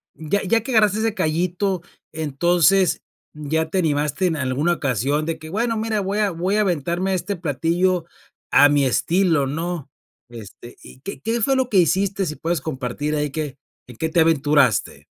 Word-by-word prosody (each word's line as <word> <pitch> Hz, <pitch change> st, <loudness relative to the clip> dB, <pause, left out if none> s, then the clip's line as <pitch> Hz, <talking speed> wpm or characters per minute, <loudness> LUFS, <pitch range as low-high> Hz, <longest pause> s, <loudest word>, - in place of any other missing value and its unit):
ya 160 Hz, +6 st, -1 dB
ya 225 Hz, +4 st, +2 dB
que 265 Hz, -, -5 dB
agarraste 215 Hz, -3 st, +3 dB
ese 225 Hz, -1 st, 0 dB
cayito, 180 Hz, +1 st, -1 dB, 0.3 s
entonces, 170 Hz, +4 st, +2 dB, 0.3 s
¿ya 155 Hz, +2 st, -2 dB
te 190 Hz, -, 0 dB
animaste 150 Hz, +2 st, 0 dB
en 165 Hz, -, -1 dB
alguna 140 Hz, +5 st, 0 dB
ocasión 140 Hz, 0 st, -1 dB
de 165 Hz, 0 st, -3 dB
que, 155 Hz, 0 st, -11 dB
bueno, 230 Hz, +5 st, -1 dB
mira, 220 Hz, -1 st, -1 dB
voy 195 Hz, +2 st, -2 dB
a 205 Hz, -2 st, +1 dB
voy 180 Hz, +4 st, -1 dB
a 215 Hz, -, +3 dB
aventarme 175 Hz, 0 st, -1 dB
a -, -, +1 dB
este 185 Hz, +2 st, -2 dB
platillo 170 Hz, +3 st, 0 dB, 0.5 s
a 145 Hz, -, +7 dB
mi 145 Hz, -1 st, +2 dB
estilo, 165 Hz, +2 st, +2 dB
¿no? 165 Hz, +1 st, -4 dB, 0.4 s
Este, 120 Hz, +1 st, -12 dB
¿y 130 Hz, -, -14 dB
qué 195 Hz, +7 st, -7 dB
qué 230 Hz, +1 st, -1 dB
fue 270 Hz, +5 st, +2 dB
lo 260 Hz, -1 st, +1 dB
que 205 Hz, -, +1 dB
hiciste? 190 Hz, +3 st, +2 dB
Si 155 Hz, -3 st, -4 dB
puedes 165 Hz, -2 st, -2 dB
compartir 145 Hz, +1 st, -3 dB
ahí, 150 Hz, -1 st, -1 dB
¿qué 150 Hz, -2 st, -4 dB, 0.3 s
en 125 Hz, -, -12 dB
qué 160 Hz, -, -1 dB
te 165 Hz, +1 st, +3 dB
aventuraste? 150 Hz, -2 st, +2 dB
165 Hz, 180 wpm, -21 LUFS, 150-195 Hz, 0.5 s, a